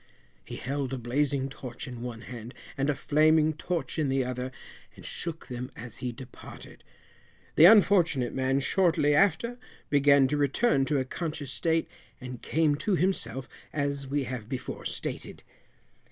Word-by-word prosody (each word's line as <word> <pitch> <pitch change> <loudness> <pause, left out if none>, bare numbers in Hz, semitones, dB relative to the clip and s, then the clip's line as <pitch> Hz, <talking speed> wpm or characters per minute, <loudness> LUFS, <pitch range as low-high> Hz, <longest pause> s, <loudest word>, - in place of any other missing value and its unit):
He - - -8
held 135 0 -3
a - - -2
blazing 135 +3 0
torch 130 -2 -7
in 120 -2 -7
one 120 -2 -6
hand, 120 0 -9 0.2
and 135 +1 0
a 145 - +2
flaming 155 +2 +3
torch 165 +1 -3
in 150 -3 +1
the 135 -1 +1
other, 125 +1 -4 0.4
and - - -13
shook 165 -1 -2
them 125 0 -6
as 115 +1 -7
he 125 -2 -3
departed. 125 +2 -12 0.7
The 160 - +8
unfortunate 180 - +5
man 135 +1 +1
shortly 165 -3 +3
after 235 +8 +2 0.3
began 140 -1 +5
to 150 - 0
return 145 - +2
to 150 0 +1
a 130 - 0
conscious 150 -1 -4
state, 165 +3 0 0.3
and 125 -1 -8
came 155 -1 +2
to 190 +6 +1
himself, 175 -7 -1 0.2
as 140 -2 -2
we 140 +1 0
have 120 -3 -6
before 130 -1 -5
stated. - - -5
140 Hz, 155 wpm, -28 LUFS, 130-155 Hz, 0.7 s, The